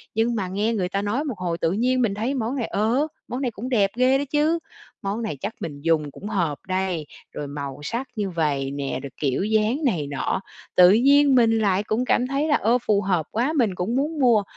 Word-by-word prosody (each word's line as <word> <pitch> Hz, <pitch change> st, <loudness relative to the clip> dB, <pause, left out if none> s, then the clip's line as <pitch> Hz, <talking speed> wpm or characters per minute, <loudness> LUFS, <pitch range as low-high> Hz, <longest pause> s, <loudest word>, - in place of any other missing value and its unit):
nhưng 230 Hz, +2 st, +1 dB
mà 195 Hz, -4 st, -2 dB
nghe 205 Hz, +5 st, 0 dB
người 185 Hz, -5 st, -1 dB
ta 195 Hz, -, -1 dB
nói 210 Hz, +8 st, -1 dB
một 270 Hz, -9 st, -4 dB
hồi 170 Hz, -2 st, -2 dB
tự 165 Hz, 0 st, 0 dB
nhiên 250 Hz, +5 st, +1 dB
mình 215 Hz, -5 st, +1 dB
thấy 230 Hz, +6 st, -1 dB
món 245 Hz, -1 st, -2 dB
này, 245 Hz, -5 st, -2 dB
ờ, 235 Hz, +8 st, +1 dB, 0.2 s
món 250 Hz, +2 st, -4 dB
này 250 Hz, -3 st, -1 dB
cũng 230 Hz, +4 st, -6 dB
đẹp 205 Hz, -6 st, +2 dB
ghê 255 Hz, +2 st, +4 dB
đó 285 Hz, -, -1 dB
chứ, 305 Hz, +3 st, +2 dB, 0.4 s
món 200 Hz, +4 st, -2 dB
này 215 Hz, -10 st, -3 dB
chắc 210 Hz, +3 st, -3 dB
mình 145 Hz, -3 st, -6 dB
dùng 155 Hz, -2 st, +1 dB
cũng 200 Hz, +8 st, -9 dB
hợp 170 Hz, -9 st, -1 dB
đây, 185 Hz, -4 st, -1 dB, 0.3 s
rồi 145 Hz, -, -5 dB
màu 140 Hz, -1 st, -6 dB
sắc 235 Hz, -, -3 dB
như 205 Hz, -3 st, -2 dB
vầy 145 Hz, -6 st, -1 dB
nè, 140 Hz, -1 st, -3 dB
rồi 140 Hz, -, -5 dB
kiểu 140 Hz, +3 st, 0 dB
dáng 220 Hz, +7 st, +1 dB
này 170 Hz, -, 0 dB
nọ. 140 Hz, +6 st, -2 dB, 0.3 s
Tự 180 Hz, 0 st, +8 dB
nhiên 275 Hz, +5 st, +5 dB
mình 225 Hz, -2 st, +4 dB
lại 200 Hz, -2 st, +2 dB
cũng 220 Hz, +4 st, -1 dB
cảm 250 Hz, 0 st, +2 dB
thấy 275 Hz, +3 st, 0 dB
là, 295 Hz, -, +3 dB
ơ, 230 Hz, +4 st, +3 dB
phù 205 Hz, -1 st, +3 dB
hợp 180 Hz, -5 st, 0 dB
quá, 245 Hz, +8 st, 0 dB
mình 220 Hz, -8 st, +2 dB
cũng 185 Hz, +7 st, -2 dB
muốn 300 Hz, +3 st, -1 dB
mua. 235 Hz, -6 st, +4 dB
215 Hz, 235 wpm, -23 LUFS, 180-250 Hz, 0.4 s, Tự